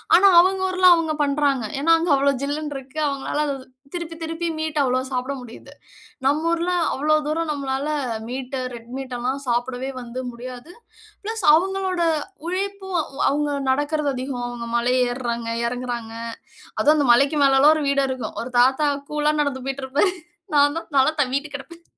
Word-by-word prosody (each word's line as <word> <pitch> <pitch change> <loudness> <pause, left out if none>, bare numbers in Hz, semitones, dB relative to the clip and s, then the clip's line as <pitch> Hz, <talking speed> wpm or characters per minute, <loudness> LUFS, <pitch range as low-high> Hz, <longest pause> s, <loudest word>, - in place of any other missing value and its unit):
ஆனா 395 +2 +7
அவுங்க 375 +1 +3
ஊர்ல 370 0 +4
அவுங்க 320 -2 -1
பண்றாங்க. 280 -3 +1 0.2
ஏனா, 330 +4 +2
அங்க 335 -1 0
அவ்ளோ 280 +1 +3
ஜில்லுன்னு 295 +1 -3
இருக்கு. 270 +3 -8
அவுங்கனால 280 +2 -1
அத 280 - -1 0.4
திருப்பி 335 -2 -5
திருப்பி 330 +1 -3
மீட் 315 -1 -3
அவ்ளோ 255 -1 +1
சாப்பிட 255 +1 -2
முடியுது. 240 -2 -12 0.5
நம்ம 300 +4 +2
ஊர்ல 340 +2 0 0.2
அவ்ளோ 305 +3 +2
தூரம் 315 +1 -1
நம்மளால 275 0 -2 0.4
மீட், 255 +1 -5 0.2
ரெட் 235 0 -10
மீட் 265 -2 -6
எல்லாம் 260 +3 -2
சாப்பிடவே 245 +2 -1
வந்து 245 +1 -7
முடியாது. 250 +6 -9 0.5
பிளஸ் 445 -2 -4
அவுங்களோட 375 0 0 0.5
உழைப்பும் 385 0 -3 0.3
அவுங்க 290 +1 +1 0.2
நடக்கறது 290 +2 +1
அதிகம். 255 -1 -4
அவுங்க 240 -1 -6
மலை 240 +1 +2 0.2
ஏற்றாங்க, 235 -2 -3 0.2
எறங்கறாங்க. 240 -2 -4 0.7
அதுவும் 300 +1 +5
அந்த 285 -3 +2
மலைக்கு 280 +5 +3
மேலல்லாம் 275 +3 +6
ஒரு 300 - -1
வீடு 280 -1 +2
இருக்கும். 260 -2 -4
ஒரு 245 +2 -7
தாத்தா 265 +4 +4 0.2
கூலா 300 0 +1
நடந்து 275 -3 -1
போய்ட்டு 270 0 -3
இருப்பாரு. 290 +8 +2 0.4
நான் 290 +2 +4
தான் 330 - -10
தல 265 +1 +5
தவ்வீட்டு 280 +2 -2
கெடப்பன். 335 +4 -9
280 Hz, 160 wpm, -22 LUFS, 255-315 Hz, 0.7 s, ஆனா